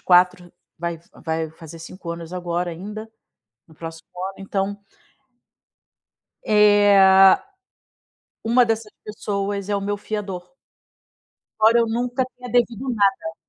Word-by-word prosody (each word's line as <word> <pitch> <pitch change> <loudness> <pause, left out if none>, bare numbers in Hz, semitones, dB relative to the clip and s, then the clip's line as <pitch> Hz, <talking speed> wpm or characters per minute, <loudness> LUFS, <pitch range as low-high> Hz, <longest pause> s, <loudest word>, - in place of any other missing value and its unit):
4, 180 -1 +3 0.3
vai 170 0 -2
f 165 - -24 0.2
vai 160 -1 -2
fazer 160 0 -12
5 170 +1 -9
anos 170 0 -7
agora 175 -1 -2
ainda, 210 +6 -8 0.6
no 160 - -19
próximo 165 0 -9 0.2
ano, 195 - -17
então 195 +1 -2 1.7
eh, 205 -1 +5
a, 190 0 +7 1.0
uma 240 +2 +4
dessas 225 -2 -2
pessoas 200 -1 -3
é 205 - 0
o 200 - -2
meu 205 +1 -2
fiador. 205 0 -5 1.1
Embora 225 +2 +5
eu 230 - +2
nunca 245 +3 -1
tenha 250 0 -9
devido 245 +1 +1
nada. 195 -7 +1
195 Hz, 125 wpm, -22 LUFS, 175-215 Hz, 1.7 s, a